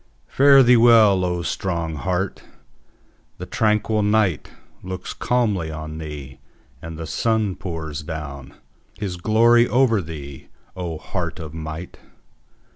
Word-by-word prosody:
Fare 140 0 +6
thee 125 0 +6
well, 110 -5 +6
O 90 -1 -1
strong 85 -2 -2
heart! 90 +5 -2 1.0
The - - -7
tranquil 110 0 +1
nightLooks 95 -2 -2
calmly 105 -10 0
on 80 0 -7
thee: 70 -4 -8 0.4
and 80 -1 -8
the 80 - -6
sun 110 +2 0
pours 80 -5 -5
downHis 75 +5 -8
glory 120 +3 +4
over 120 -4 +3
thee, 75 -5 -9 0.3
O 85 -3 -4
heart - - -4
of 80 -3 -8
might! 80 +2 -7
90 Hz, 115 wpm, -22 LUFS, 80-110 Hz, 1.0 s, Fare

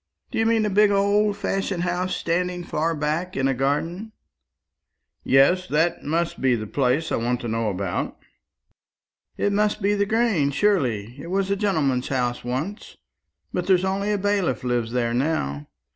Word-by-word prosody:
Do - - -2
you 225 - +3
mean 225 -1 +2
a - - +1
big 210 +1 +5
old 200 +1 +2
fashioned 195 -3 -2
house 180 +1 -1
standing 180 +1 -1
far 165 0 -1
back 155 +5 -2
in 135 0 +2
a 135 - +2
garden?" 165 - -2 1.1
"Yes; 175 +8 +4
that 160 +2 +1
must 165 +3 -1
be 130 -2 +3
the 110 -2 -4
place 135 +7 0
I - - +1
want 120 +1 -1
to 120 - -4
know 115 -1 -1
about." 95 -2 -3 1.2
"It 205 - +1
must 210 +1 +1
be 205 0 +1
the 200 0 +1
Grange, 215 - +1
surely. 125 - +1
It - - -8
was 195 +1 0
a - - +3
gentleman's 155 -11 0
house 125 -2 -1
once; 135 - -4 0.6
but 180 0 -2
there's 190 -1 +4
only 200 +2 -1
a 205 - +1
bailiff 195 - 0
lives 120 -2 -1
there 120 -1 0
now. 120 - -1
170 Hz, 170 wpm, -23 LUFS, 130-200 Hz, 1.2 s, big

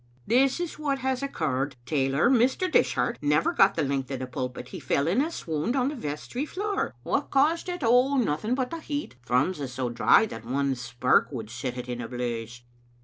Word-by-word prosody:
"This 265 +5 +3
is 350 -3 -4
what 285 -3 0
has 260 -1 0
occurred. 145 - -2
Tailor: 135 - +2
Mr. 260 +9 +3
Dishart, - - +2
never 150 +2 +2
got 195 0 +5
the 160 - +1
length 135 -1 -1
of 135 - -3
the 130 - -4
pulpit. 125 0 -5
He - - -7
fell 140 +2 0
in 195 +10 +3
a 310 - 0
swound 165 - -2
on 260 0 +2
the 300 - -5
vestry 230 - -4
floor. 405 +6 -2
What - - -1
caused 310 +6 +2
it? 355 -4 -4
Oh, 250 +4 +4
nothing 215 - 0
but 255 -1 -2
the 330 - -4
heat. 290 - -5
Thrums 130 +8 +1
is 135 -3 -4
so 125 -1 -2
dry 170 - +5
that 210 - -8
one 135 +3 0
spark 125 +1 +1
would 115 -5 -6
set 125 +1 -4
it 125 0 -5
in 120 -1 -4
a 115 - -5
blaze." 120 -1 -4
150 Hz, 205 wpm, -27 LUFS, -, -, got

